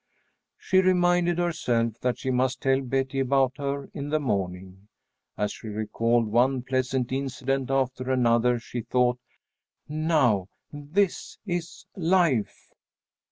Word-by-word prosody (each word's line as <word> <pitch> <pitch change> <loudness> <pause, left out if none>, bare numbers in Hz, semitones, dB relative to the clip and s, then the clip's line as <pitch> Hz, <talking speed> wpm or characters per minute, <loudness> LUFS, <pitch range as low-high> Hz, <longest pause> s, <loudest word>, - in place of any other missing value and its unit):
She 190 - +2
reminded 175 -2 +3
herself 120 -10 0
that 125 -1 -1
she 130 - -2
must 130 +1 0
tell 135 0 +3
Betty 135 +1 -1
about 135 0 +2
her 140 0 -3
in 145 0 -5
the 155 +1 +1
morning. 95 -5 -3 0.5
As 105 - -1
she - - -10
recalled 115 +2 0
one 125 +4 +2
pleasant 130 -1 -1
incident 135 0 -2
after 130 -1 -1
another, 120 -1 +3
she 120 +1 -6
thought, 125 +1 +1 0.7
"Now 150 - +1 0.2
this 160 +7 -1
is 175 -1 -4
life! 170 - +1
130 Hz, 120 wpm, -26 LUFS, 120-145 Hz, 0.7 s, reminded